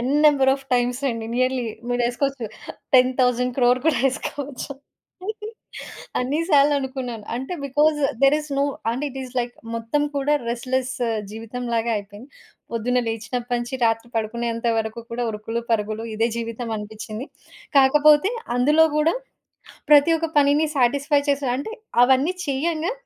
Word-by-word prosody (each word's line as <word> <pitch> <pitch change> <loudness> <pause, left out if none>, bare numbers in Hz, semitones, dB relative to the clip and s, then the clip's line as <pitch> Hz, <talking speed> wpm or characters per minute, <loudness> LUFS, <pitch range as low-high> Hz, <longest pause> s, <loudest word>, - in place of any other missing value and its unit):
N 250 +3 -1
number 275 -3 +5
of 270 0 -10
times 245 +1 +1
అండి. 230 -2 -3
Nearly 255 -1 +1 0.2
మీరేసుకోవచ్చు, 245 +1 -1 0.5
10,000,00,00,000 250 0 +3
కూడా 320 - +3
యేసుకోవచ్చు. 280 +1 -4 1.5
అన్ని 265 +4 -1
సార్లనుకున్నాను. 265 -5 +1
అంటే 265 +8 -4
because 295 +3 +2 0.2
there 275 +2 +6
is 300 -1 -10
no - - +3 0.3
and 245 +4 -3
it 270 - -8
is 255 -1 -9
like 240 0 -5 0.2
మొత్తం 230 +6 -1
కూడా 280 +2 +2
రెస్ట్‌లెస్ 255 +2 -1 0.4
జీవితంలాగా 230 +1 -3
అయిపోయింది. 205 +5 -11 0.4
పొద్దున్న 245 +2 +1
లేచినప్పటి 240 +2 -2
నుంచి 240 +2 -4
రాత్రి 225 +1 +1
పడుకునేంత 230 +1 -2
వరకు 220 +1 -3
కూడా 240 +1 -2
ఉరుకులు 225 +2 -4
పరుగులు. 215 +1 -1
ఇదే 225 +2 +1
జీవితం 230 0 -4
అనిపిచ్చింది. 215 +3 -7 0.5
కాకపోతే 295 +6 +5 0.3
అందులో 300 +6 +5
గూడా 310 +2 +3 0.8
ప్రతి 295 +2 +7
ఒక్క 330 0 -1
పనిని 290 +2 +4
సాటిస్‌ఫై 280 +3 +2
చేసి 280 -1 +1
అంటే 290 +12 -5 0.3
అవన్నీ 265 +8 +3
చేయంగా, 315 - -1
250 Hz, 130 wpm, -23 LUFS, 235-280 Hz, 1.5 s, ప్రతి